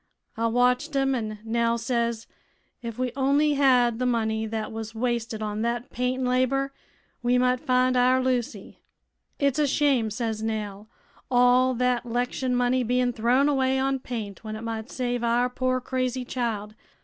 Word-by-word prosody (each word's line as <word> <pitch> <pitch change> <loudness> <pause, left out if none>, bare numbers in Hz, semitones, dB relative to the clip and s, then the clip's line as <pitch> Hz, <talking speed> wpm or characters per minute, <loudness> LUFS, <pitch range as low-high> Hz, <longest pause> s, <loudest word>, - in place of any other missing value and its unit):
I 230 +1 0
watched 250 +5 +1
'em, 270 0 +2
an' 215 -4 -3
Nell 230 +1 +1
says 235 -1 -1 0.6
if 230 -1 -6
we 255 -1 -1
on'y 280 +2 +2
had 250 -4 +3
th' 250 - +1
money 220 -2 0
thet 220 0 -4
was 225 0 -6
wasted 230 -2 -2
on 210 0 -3
thet 235 +1 -2
paint 250 +1 -1
an' - - 0
labor, 260 +2 +1 0.5
we 245 +1 +2
might 250 0 +2
find 255 -2 +2
our 250 +1 +4
Lucy. 245 -6 -2 0.6
'It's 280 -1 +1
a 295 - +3
shame,' 270 -5 +2
says 220 0 -3
Nell, 215 -1 -4 0.4
'all 250 +1 +4
thet 250 0 +1
'lection 245 +1 -1
money 245 +1 +2
bein' 250 +1 +1
thrown 245 +5 +2
away 265 -2 +2
on 270 0 0
paint 220 -6 -6
when 215 -1 -5
it 215 - -7
might 225 +1 -5
save 245 -1 -2
our 240 +1 +2
poor 255 0 0
crazy 255 0 -2
child.' 225 -5 -3
245 Hz, 165 wpm, -25 LUFS, 230-255 Hz, 0.6 s, our